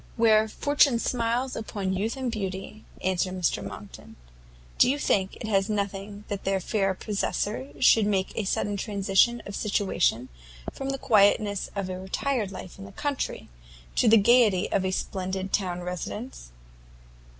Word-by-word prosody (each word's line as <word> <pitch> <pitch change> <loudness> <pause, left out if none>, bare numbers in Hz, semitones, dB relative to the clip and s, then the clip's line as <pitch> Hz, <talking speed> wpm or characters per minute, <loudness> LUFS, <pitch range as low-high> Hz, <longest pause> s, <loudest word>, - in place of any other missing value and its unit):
"Where 220 -1 +5
fortune 285 +2 +3
smiles 240 +2 -1
upon 200 -4 -3
youth 215 +6 -2
and 260 -2 -2
beauty," 195 0 -5 0.2
answered 185 0 0
Mr 180 -3 0
Monckton, - - -10 0.6
"do - - +6
you 280 - +1
think 195 -9 0
it 200 -3 0
nothing 200 0 -3
that 200 -1 -4
their 195 0 +1
fair 195 0 0
possessor 200 - -2
should 210 +9 +5
make 195 -2 0
a 215 - -2
sudden 205 +1 -1
transition 200 +3 +2
of 200 - -6
situation 190 - 0 0.4
from 270 - -5
the 270 - -1
quietness 205 -4 +3
of 200 -2 -2
a 185 0 -5
retired 210 +3 -2
life 185 0 -9
in 195 - -8
the 200 - -11
country, 285 +2 -3 0.5
to - - +4
the 225 +1 +7
gaiety 210 -3 +4
of 195 - +1
a 190 - 0
splendid 190 0 -3
town 180 -3 0
residence?" 180 - -6
200 Hz, 150 wpm, -26 LUFS, 190-225 Hz, 0.6 s, the